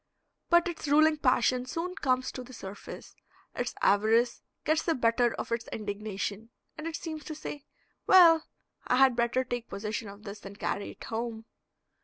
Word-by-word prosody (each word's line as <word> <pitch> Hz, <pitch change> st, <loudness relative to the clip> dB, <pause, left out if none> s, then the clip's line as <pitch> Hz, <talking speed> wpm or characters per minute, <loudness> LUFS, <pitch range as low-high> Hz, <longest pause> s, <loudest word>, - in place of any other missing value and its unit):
But 345 Hz, 0 st, +5 dB
its 335 Hz, -3 st, -5 dB
ruling 310 Hz, +2 st, +5 dB
passion 255 Hz, -2 st, +2 dB
soon 345 Hz, +5 st, -3 dB
comes 255 Hz, -7 st, 0 dB
to 255 Hz, -, -7 dB
the 255 Hz, +1 st, -13 dB
surface, 195 Hz, -2 st, -9 dB, 0.4 s
its -, -, -3 dB
avarice 225 Hz, +4 st, +3 dB, 0.2 s
gets 315 Hz, +1 st, +2 dB
the 330 Hz, -, 0 dB
better 235 Hz, 0 st, +2 dB
of -, -, -6 dB
its 230 Hz, 0 st, -2 dB
indignation, 210 Hz, 0 st, -4 dB, 0.3 s
and 310 Hz, +1 st, -6 dB
it 330 Hz, -, -4 dB
seems 315 Hz, -3 st, -6 dB
to 310 Hz, -, -6 dB
say, 295 Hz, -2 st, -7 dB, 0.4 s
"Well, 335 Hz, -4 st, +7 dB, 0.4 s
I -, -, +3 dB
had 260 Hz, -1 st, +5 dB
better 235 Hz, +2 st, +1 dB
take 245 Hz, -2 st, -5 dB
possession 210 Hz, +1 st, -4 dB
of 200 Hz, +1 st, -12 dB
this 205 Hz, -1 st, -9 dB
and 200 Hz, +1 st, -9 dB
carry 200 Hz, 0 st, -2 dB
it -, -, -11 dB
home." 225 Hz, 0 st, -4 dB
245 Hz, 170 wpm, -29 LUFS, 220-305 Hz, 0.4 s, Well